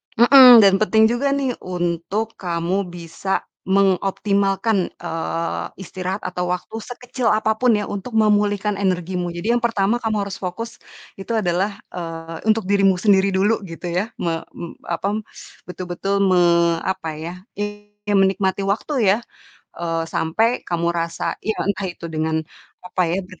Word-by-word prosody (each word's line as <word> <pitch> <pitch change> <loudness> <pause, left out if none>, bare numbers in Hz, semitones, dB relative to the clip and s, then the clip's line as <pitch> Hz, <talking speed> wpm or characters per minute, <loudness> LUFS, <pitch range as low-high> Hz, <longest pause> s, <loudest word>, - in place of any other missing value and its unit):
Mhm, 245 -1 +9
dan 195 -1 +6
penting 220 +1 +4
juga 260 +4 0
nih 270 -2 0
untuk 180 +5 -2
kamu 180 +2 -1
bisa 175 +3 -3 0.2
mengoptimalkan, 195 +1 +1
eee, 165 +1 -3
istirahat 185 +1 -5
atau 180 -1 -3
waktu 180 - -12
sekecil 245 +1 -4
apa 220 +1 +2
pun 245 -3 +4
ya 210 - 0
untuk 205 +4 -6
memulihkan 210 -1 +2
energimu. 180 -2 -1
Jadi 210 +7 -1
yang 240 - +3
pertama 230 0 +1
kamu 215 -3 -1
harus 200 -1 -6
fokus 230 +6 -5 0.4
itu 230 +4 -3
adalah, 195 0 0 0.2
eee, 165 +2 -7
untuk 220 -1 +3
dirimu 195 -1 +3
sendiri 195 0 +3
dulu 210 +4 +2
gitu 170 +1 -6
ya. 185 +5 0
Me 165 -1 -2 0.2
mmm, 170 - -9
apa, 200 +5 -1 0.5
betul-betul 185 +2 -2
me 185 -2 +4 0.4
apa 185 -4 -3
ya, 170 +2 -5 0.3
I 205 0 -5 0.2
ya 205 - +2
menikmati 195 0 +2
waktu 205 +9 -1
ya, 195 0 +4 0.6
eee, 165 -1 -1
sampai 220 +9 0
kamu 170 0 0
rasa 170 -1 -3
ya 220 - -2
entah 200 -1 -1
itu 175 -1 -10
dengan 160 0 -1 0.5
apa 180 0 -1
ya, 180 +3 0
ber 185 -2 -14
195 Hz, 150 wpm, -21 LUFS, 175-215 Hz, 0.6 s, Mhm